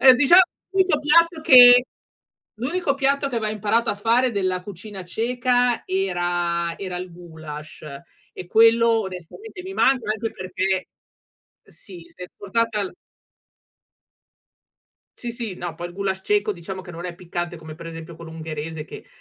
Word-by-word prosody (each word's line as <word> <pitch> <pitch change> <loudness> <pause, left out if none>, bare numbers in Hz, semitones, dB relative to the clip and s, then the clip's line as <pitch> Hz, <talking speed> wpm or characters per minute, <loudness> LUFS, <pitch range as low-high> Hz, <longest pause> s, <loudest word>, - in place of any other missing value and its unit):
Ehm, 260 -1 +8
diciamo, 320 +8 +7 0.3
l'unico 375 -6 +2
piatto 330 +3 +3
che 250 -3 +9 0.7
l'unico 285 +4 -1
piatto 275 0 +1
che 245 - -3
aveva 215 -2 -1
imparato 215 +3 0
a - - -2
fare 235 +4 +2
della 185 -3 -1
cucina 195 0 -9
ceca, 245 +4 0
era 175 -2 -1
era 185 -2 -5
il 180 0 -7
gulasch, 160 -3 -10 0.5
e 180 - -8
quello 230 +3 +4
onestamente 190 - -9
mi 380 +1 -7
manca, 255 - +2
anche 220 +1 -4
perché 185 0 -2 0.8
sì, 180 -5 -13
s'è 180 +1 -11
portata 215 +1 -1
l - - -7 2.3
Sì 240 -1 -5
sì, 230 -5 -5
no 175 -2 -6
poi 175 +2 -6
il 175 - -11
gulasch 190 -1 -2
ceco, 210 +1 +1
diciamo 190 +1 -8
che 180 - -11
non 170 +1 -7
è 175 - -6
piccante 175 -1 -5
come, 160 -1 -10
per 165 +1 -11
esempio, 165 0 -9
quello 165 0 -10
ungherese, 160 -1 -6
che, - - -11
200 Hz, 150 wpm, -22 LUFS, 175-245 Hz, 2.3 s, che